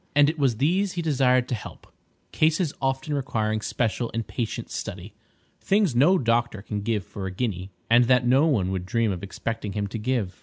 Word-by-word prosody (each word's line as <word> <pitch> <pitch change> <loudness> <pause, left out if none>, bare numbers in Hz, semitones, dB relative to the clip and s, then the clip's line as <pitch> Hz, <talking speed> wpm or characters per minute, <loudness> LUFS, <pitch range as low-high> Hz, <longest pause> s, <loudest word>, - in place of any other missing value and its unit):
And 145 +1 +5
it 160 - -12
was 130 -6 +2
these 180 - +1
he 175 - -3
desired 130 -5 +2
to - - -1
help: 110 - -7 0.5
cases 155 0 +1
often 135 +2 -1
requiring 110 -6 -1
special 115 +1 -1
and 115 -1 -2
patient 115 -3 -4
study—things 115 - -3
no 160 +10 +5
doctor 115 - 0
can 105 -1 -4
give 105 -1 -1
for 95 +1 -6
a - - -4
guinea, 95 -2 -3 0.2
and 120 +1 +5
that 125 0 +3
no 135 +6 +4
one 100 - +1
would 90 -1 -3
dream 115 0 +1
of 90 -2 -4
expecting 105 +1 -4
him 105 -1 -1
to 105 +3 -5
give. 110 -5 -2
120 Hz, 190 wpm, -25 LUFS, 105-140 Hz, 0.5 s, And